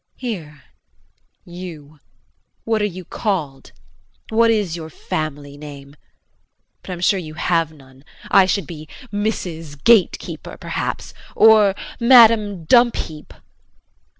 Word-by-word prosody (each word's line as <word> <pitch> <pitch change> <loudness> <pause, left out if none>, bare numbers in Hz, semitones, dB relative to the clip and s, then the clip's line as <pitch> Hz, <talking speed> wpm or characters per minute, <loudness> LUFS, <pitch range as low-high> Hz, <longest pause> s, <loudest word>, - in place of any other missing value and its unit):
Hear, 165 - -6 0.8
you, 165 -4 -10 0.6
what 225 -1 0
are - - +2
you 185 -3 -6
called, 160 -10 -3 0.6
what 230 +1 +3
is 205 -7 0
your 160 -2 -7
family 145 -2 -5
name? 145 -1 -11 0.9
But - - -14
I'm 175 - -7
sure 195 +2 +2
you 155 -3 -8
have 165 -1 0
none. 135 -3 -18 0.3
I 190 -1 +6
should 200 +1 0
be 155 -3 -10 0.2
"Mrs. 165 -8 -4
Gate 230 -5 +5
Keeper," - - -9
perhaps, - - -4 0.2
or 215 -3 +6 0.2
"Madame 225 -6 +5
Dumpheap." 235 -8 +2
175 Hz, 115 wpm, -20 LUFS, 150-210 Hz, 0.9 s, I